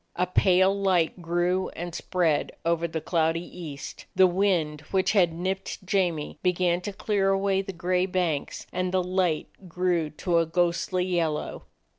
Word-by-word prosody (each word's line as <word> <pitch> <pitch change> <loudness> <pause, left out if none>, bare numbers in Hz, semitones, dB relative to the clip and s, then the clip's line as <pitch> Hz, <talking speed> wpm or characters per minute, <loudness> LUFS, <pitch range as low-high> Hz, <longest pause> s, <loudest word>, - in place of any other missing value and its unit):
A 180 - +1
pale 185 +1 +3
light 185 -3 +1
grew 175 +2 0
and 175 0 -5
spread 170 -4 0
over 170 0 +1
the 160 0 -3
cloudy 165 +1 0 0.2
east, 145 -4 -8
the 190 - +7
wind 175 -5 +1
which 190 -1 +2
had 185 -6 +4
nipped 185 +3 -4
J 190 0 +2
amie 155 -3 -6
began 180 -1 +1
to 205 - -4
clear 195 -1 0
away 195 0 +2
the 195 - -6
gray 180 +1 0
banks, 175 -6 -2
and 185 0 -1
the 185 -1 +1
light 180 -3 0 0.2
grew 175 -2 0
to 170 +3 0
a 165 - +1
ghostly 175 +2 0
yellow. 170 -4 -2
180 Hz, 160 wpm, -26 LUFS, 165-185 Hz, 0.2 s, the